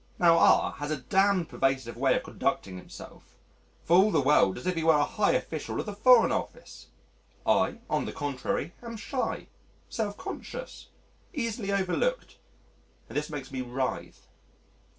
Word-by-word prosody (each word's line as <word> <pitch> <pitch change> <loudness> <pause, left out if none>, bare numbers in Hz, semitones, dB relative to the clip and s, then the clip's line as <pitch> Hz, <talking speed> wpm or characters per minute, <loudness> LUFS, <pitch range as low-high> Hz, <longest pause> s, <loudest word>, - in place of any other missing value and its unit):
Now 170 -1 +5
R - - +5
has 145 0 -4
a 155 - -1
damned 190 +5 +2
pervasive 135 -3 -1
way - - +2
of - - -1
conducting 95 -2 -2
himself 90 - -13 0.5
for 170 - +4
all 200 +3 +5
the 160 - +2
world 135 -8 +3
as 125 - -9
if 185 - +1
he 165 -2 -2
were 160 -1 +5
a 145 - +3
high 210 -2 +1
official 155 -2 -3
of - - -3
the 210 - -5
Foreign 230 +3 +5
Office. - - -5 0.6
I, - - +2
on - - 0
the - - -4
contrary, 145 +2 -3
am 230 -1 -7
shy, 255 +4 -3 0.4
self 210 -3 -3
conscious, - - -8 0.5
easily 230 -6 -2
overlooked, 200 - -1 0.7
and - - -10
this 150 +1 -1
makes 140 -3 -7
me 130 -1 -3
writhe. 125 +1 -4
170 Hz, 160 wpm, -28 LUFS, 140-210 Hz, 0.7 s, Now